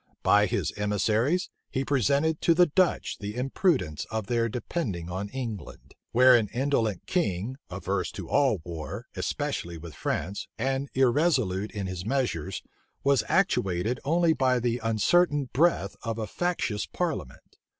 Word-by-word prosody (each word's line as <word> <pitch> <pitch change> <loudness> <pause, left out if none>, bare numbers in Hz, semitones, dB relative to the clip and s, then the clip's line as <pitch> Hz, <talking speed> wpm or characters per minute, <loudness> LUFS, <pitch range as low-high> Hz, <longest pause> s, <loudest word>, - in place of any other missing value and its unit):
By 105 0 +5
his 90 -4 -1
emissaries, 110 - +1 0.2
he 130 - -1
represented 140 +4 +1
to 170 - +4
the 180 +1 +6
Dutch 175 +3 +1
the 105 +1 -5
imprudence 130 - 0
of 110 -2 -3
their 115 +1 +1
depending 105 - -3
on 95 +3 -3
England; 115 -5 -7 0.2
where 125 +2 +7
an 115 -3 +3
indolent 115 -4 0
king, 130 - -1
averse - - -2
to - - -7
all 130 - +2
war, 80 -2 -6
especially 85 0 -3
with 80 0 -9
France, 95 +7 -3
and 135 +3 -1
irresolute 125 - +2
in 100 -2 -4
his 90 -1 -4
measures, 100 - -2 0.4
was 140 -5 +3
actuated 115 - +1
only 165 +3 +3
by 130 -4 +2
the 120 0 0
uncertain 135 - +2
breath 150 - +2
of 115 -1 -3
a 110 - -2
factious 115 - -2
parliament. - - -4
120 Hz, 140 wpm, -27 LUFS, 100-140 Hz, 0.4 s, where